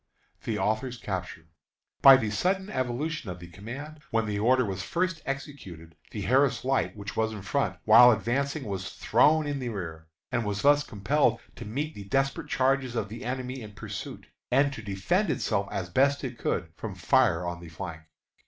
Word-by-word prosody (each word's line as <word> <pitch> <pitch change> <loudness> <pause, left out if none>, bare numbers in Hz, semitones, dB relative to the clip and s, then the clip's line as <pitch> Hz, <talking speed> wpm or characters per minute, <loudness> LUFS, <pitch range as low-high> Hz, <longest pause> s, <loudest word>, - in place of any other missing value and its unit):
THE 110 - -1
AUTHOR'S 115 +4 -1
CAPTURE. 90 -6 -5 0.6
By 135 -1 +10
the 110 -5 -2
sudden 190 - 0
evolution 130 - -2
of 90 - -5
the 90 - -10
command, 135 - -8
when 115 0 +1
the 105 -1 -2
order 125 +3 +3
was 95 -2 -3
first 170 - -1
executed, 115 - -7
the 105 - -5
Harris 125 +4 +2
Light, 135 -4 0
which 100 -1 -7
was 110 0 0
in 105 -3 -7
front, 140 +7 -1
while 115 +3 +9
advancing, 135 +7 -1
was 95 -4 -4
thrown 155 +1 +3
in 145 -1 -2
the 125 -2 -3
rear, 80 -7 -6 0.2
and 120 -2 0
was 105 -1 -3
thus 145 +1 +5
compelled 120 +2 +1 0.2
to 120 - -8
meet 145 +9 -3
the 100 - -9
desperate 135 - 0
charges 130 -2 +1
of 115 - -2
the 115 +4 -8
enemy 130 +1 -4
in 105 -2 -9
pursuit, 105 - -7 0.2
and 140 +2 +3
to 120 - -7
defend 110 - 0
itself 100 -8 0
as 95 -3 -3
best 140 +10 +2
it 125 -3 -5
could 85 - -1
from 105 -1 -6
fire 90 - +2
on 85 0 -4
the 85 -1 -10
flank. 85 -1 -7
120 Hz, 185 wpm, -28 LUFS, 100-135 Hz, 0.6 s, By